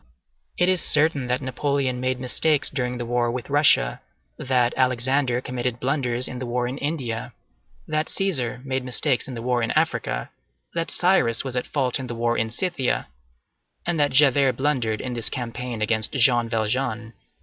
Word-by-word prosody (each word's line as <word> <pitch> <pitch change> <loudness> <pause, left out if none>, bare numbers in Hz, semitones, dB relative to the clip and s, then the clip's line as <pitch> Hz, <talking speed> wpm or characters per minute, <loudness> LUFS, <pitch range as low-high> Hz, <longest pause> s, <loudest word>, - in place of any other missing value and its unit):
It 180 - +2
is 185 -2 +3
certain 145 -3 +3
that 125 +2 -1
Napoleon 130 0 -1
made 130 0 -1
mistakes 145 +4 +2
during 125 -3 -2
the 120 - -4
war 120 0 0
with 125 +2 -5
Russia, 145 - +3 0.3
that 125 - +1
Alexander 130 0 +1
committed 125 -1 -3
blunders 125 -2 0
in 125 - -6
the 125 - -5
war 120 +1 -1
in 130 +3 -5
India, 125 -6 -3 0.5
that 155 0 -1
Cæsar 130 - -1
made 130 -1 -2
mistakes 125 +1 +1
in 130 - -7
the 115 - -6
war 125 -1 0
in 115 - -1
Africa, - - -1 0.4
that 165 0 -2
Cyrus 175 -11 +3
was 130 -2 -5
at 125 - -2
fault 135 -3 -1
in 130 - -6
the 120 - -5
war 120 0 0
in 110 -1 -1
Scythia, 140 0 -1 0.8
and 170 -2 -1
that 145 -1 +3
Javert 135 -1 +4
blundered 125 -5 -1
in 125 - -5
this 115 -2 +1
campaign 120 -2 -4
against 110 0 +2
Jean 120 -3 +3
Valjean. 115 0 -2
125 Hz, 170 wpm, -23 LUFS, 120-140 Hz, 0.8 s, Javert